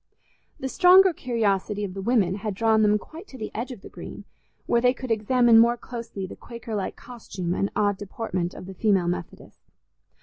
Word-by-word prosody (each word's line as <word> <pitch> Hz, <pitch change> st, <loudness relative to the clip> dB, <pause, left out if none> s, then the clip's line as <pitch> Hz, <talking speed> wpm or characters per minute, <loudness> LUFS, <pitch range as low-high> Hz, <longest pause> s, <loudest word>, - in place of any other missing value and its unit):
The 265 Hz, -, -3 dB
stronger 370 Hz, +4 st, +6 dB
curiosity 210 Hz, -6 st, -1 dB
of 190 Hz, -2 st, -4 dB
the 195 Hz, -, -5 dB
women 200 Hz, -4 st, +1 dB
had 205 Hz, -1 st, -4 dB
drawn 220 Hz, +1 st, +3 dB
them 210 Hz, 0 st, +4 dB
quite 325 Hz, -, -12 dB
to 265 Hz, -, -12 dB
the 215 Hz, -3 st, -6 dB
edge 240 Hz, +5 st, -4 dB
of 235 Hz, -6 st, -9 dB
the -, -, -11 dB
Green, -, -, -10 dB, 0.4 s
where 235 Hz, -, +2 dB
they 250 Hz, +1 st, +3 dB
could 255 Hz, -1 st, -6 dB
examine 230 Hz, +1 st, +4 dB
more 235 Hz, +1 st, +4 dB
closely 230 Hz, -6 st, -7 dB
the 185 Hz, -, -9 dB
Quakerlike 230 Hz, -4 st, -5 dB
costume 195 Hz, -7 st, -6 dB
and 195 Hz, +2 st, 0 dB
odd 205 Hz, -1 st, +1 dB
deportment 190 Hz, -4 st, -4 dB
of -, -, -9 dB
the 190 Hz, -, -8 dB
female 190 Hz, -3 st, +2 dB
Methodists. 175 Hz, -, -6 dB
220 Hz, 190 wpm, -25 LUFS, 195-240 Hz, 0.4 s, stronger